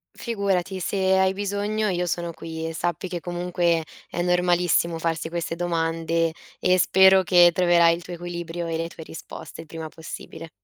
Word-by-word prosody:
Figurati, 195 -4 -1
se 200 - -2 0.2
hai 190 0 +3
bisogno 205 +2 -1
io 180 -1 0
sono 170 0 -2
qui 160 0 -6
e 165 - -5
sappi 175 +2 -2
che 175 -1 -5
comunque 175 -1 0 0.3
è 175 - -3
normalissimo 175 -1 +2
farsi 165 0 -2
queste 170 -1 -3
domande 165 -1 0 0.3
e 185 0 +3
spero 190 +1 +6
che 175 -1 +6
troverai 175 -1 +4
il 170 - -10
tuo 175 - -8
equilibrio 170 0 -5
e 165 - -2
le 165 +1 -2
tue 165 - -10
risposte 160 0 -9
il 165 - -14
prima 160 +1 -6
possibile. 160 +1 -9
175 Hz, 170 wpm, -24 LUFS, 165-180 Hz, 0.3 s, spero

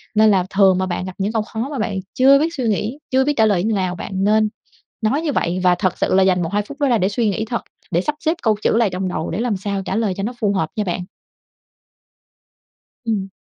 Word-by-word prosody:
Nên 215 0 +6
là 185 -2 +2
thường 195 -2 +4
mà 185 - 0
bạn 185 0 -3
gặp 185 - -6
những 200 +2 -1
câu 220 - +1
khó 225 +4 -4
mà 275 - -4
bạn 205 -3 -1
chưa 275 +2 +6
biết 325 +3 0
suy 265 - -3
nghĩ, 220 +6 -1
chưa 260 +1 +4
biết 295 - +2
trả 220 - +5
lời 195 -5 +2
như 220 +1 +1
nào 185 -2 -1
bạn 185 - -7
nên 215 +1 +3 0.5
nói 250 +8 +1
như 320 - -1
vậy 180 -7 0
và 180 -1 +5
thật 185 -1 -1
sự - - 0
là 190 0 +5
dành 185 -1 +3
1-2 190 +5 0
phút 280 +8 -11
đó 285 - +2
ra 240 -3 +3
để 190 0 +1
suy 220 +1 0
nghĩ 220 +3 -2
thật, 235 +1 -3 0.3
để 175 0 +2
sắp 300 +10 -2
xếp 330 +1 0
câu 220 -2 +3
chữ - - +2
lại 230 -3 +3
trong 185 +1 -3
đầu 170 -3 -3
để 170 - -2
làm 230 -4 0
sao 200 0 -3
trả 195 - -2
lời 215 -4 0
cho 195 - -3
nó 240 +4 -2
phù 205 -3 +1
hợp 160 -5 0
nha 210 - 0
bạn. 180 -1 -2 2.1
Ừm. 210 -4 -1
210 Hz, 265 wpm, -20 LUFS, 190-230 Hz, 2.1 s, Nên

